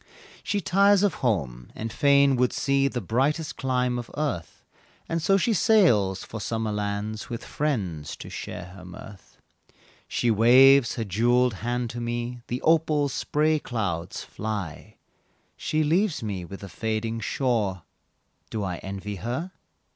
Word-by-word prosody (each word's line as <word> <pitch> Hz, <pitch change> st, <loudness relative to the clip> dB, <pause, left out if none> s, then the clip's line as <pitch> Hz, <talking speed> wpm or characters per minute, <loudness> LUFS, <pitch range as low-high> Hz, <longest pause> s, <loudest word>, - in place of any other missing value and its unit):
She 205 Hz, -, -1 dB
tires 200 Hz, +3 st, +4 dB
of 205 Hz, -, +3 dB
home, 70 Hz, -, -1 dB
and 115 Hz, 0 st, -5 dB
fain 140 Hz, -1 st, +4 dB
would 125 Hz, 0 st, +2 dB
see 140 Hz, -1 st, +2 dB
The 125 Hz, -3 st, -3 dB
brightest 135 Hz, -, 0 dB
clime 125 Hz, -1 st, 0 dB
of 120 Hz, -, -7 dB
earth, 140 Hz, -, -3 dB, 0.4 s
And 165 Hz, 0 st, -1 dB
so 195 Hz, +4 st, +4 dB
she 225 Hz, +4 st, +1 dB
sails 140 Hz, -, +3 dB
for 110 Hz, -, -7 dB
summer 110 Hz, 0 st, -2 dB
lands 105 Hz, +1 st, -3 dB
With 120 Hz, 0 st, -5 dB
friends 95 Hz, -, -2 dB
to -, -, -10 dB
share 90 Hz, 0 st, -7 dB
her 90 Hz, -1 st, -12 dB
mirth; 95 Hz, +2 st, -12 dB, 0.7 s
She 120 Hz, -, +1 dB
waves 125 Hz, +3 st, +6 dB
her 115 Hz, -, -2 dB
jewelled 120 Hz, +5 st, +2 dB
hand 120 Hz, 0 st, -2 dB
to 120 Hz, 0 st, -5 dB
me 120 Hz, +1 st, -3 dB
The 125 Hz, +1 st, -4 dB
opal 155 Hz, -3 st, +3 dB
spray 155 Hz, +4 st, +1 dB
clouds 95 Hz, -, -3 dB
fly; 105 Hz, -8 st, -5 dB, 0.6 s
She 155 Hz, 0 st, 0 dB
leaves 165 Hz, -, +1 dB
me 100 Hz, -5 st, -4 dB
with 95 Hz, +3 st, -9 dB
the 100 Hz, -, -7 dB
fading 110 Hz, +2 st, -2 dB
shore 110 Hz, -, -1 dB, 0.7 s
Do 110 Hz, -2 st, -3 dB
I 90 Hz, -2 st, -3 dB
envy 100 Hz, +2 st, -6 dB
her? 125 Hz, -, -4 dB
120 Hz, 145 wpm, -26 LUFS, 105-140 Hz, 0.7 s, waves